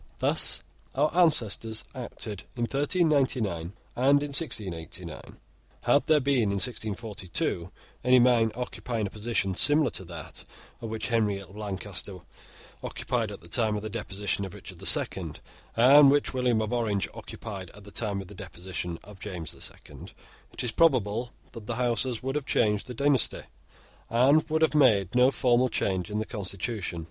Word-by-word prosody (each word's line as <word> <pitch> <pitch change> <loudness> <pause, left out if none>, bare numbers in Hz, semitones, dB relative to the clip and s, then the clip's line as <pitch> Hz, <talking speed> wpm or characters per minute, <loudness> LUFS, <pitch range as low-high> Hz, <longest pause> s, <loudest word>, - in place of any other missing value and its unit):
Thus - - +2 0.3
our 150 +4 +1
ancestors 115 - +2
acted 115 -5 -6
in 120 - -2
1399 130 - +1 0.2
and 140 +3 +4
in 145 - -4
1689. 105 - -4 0.4
Had 145 - +3
there 155 -1 +5
been, 140 -2 +2
in 100 -2 0
1642, 100 -5 -2 0.3
any 130 0 +6
man 120 -2 +4
occupying 120 -2 -3
a 100 - -5
position 105 -3 -1
similar 145 - +4
to - - -3
that 85 -3 -9 0.4
which 110 +1 -4
Henry 110 -4 +1
of 100 0 -12
Lancaster 100 -2 -3 0.6
occupied - - -2
at - - -9
the 85 - -15
time 110 +3 +1
of 105 - -4
the 110 - -5
deposition 100 -2 -3
of 95 - -7
Richard - - -10
the - - -4
Second, - - +4 0.4
and 140 +4 +8
which 145 0 +2
William 125 -4 +1
of 110 - -3
Orange 110 -5 0
occupied 100 -5 -8
at 105 - -13
the 100 - -12
time 100 -3 -1
of 95 - -10
the 105 - -11
deposition 90 -1 -6
of 100 -1 -13
James 90 -6 -6
the - - -12
Second, - - -8 0.4
it - - -4
is 120 - 0
probable 120 -6 +2 0.2
that 110 -2 -10
the 120 - -2
Houses 120 0 +1
would 135 +1 -2
have 150 -1 -3
changed 105 -1 +1
the 125 - -7
dynasty, 140 -1 +2 0.7
and 135 +8 +4
would 160 +1 +2
have 160 - +3
made 110 -10 +4
no 125 +1 +5
formal 125 -1 +2
change 95 -3 -1
in 105 - -3
the 110 - -1
constitution. 100 -3 -4
110 Hz, 165 wpm, -27 LUFS, 100-130 Hz, 0.7 s, and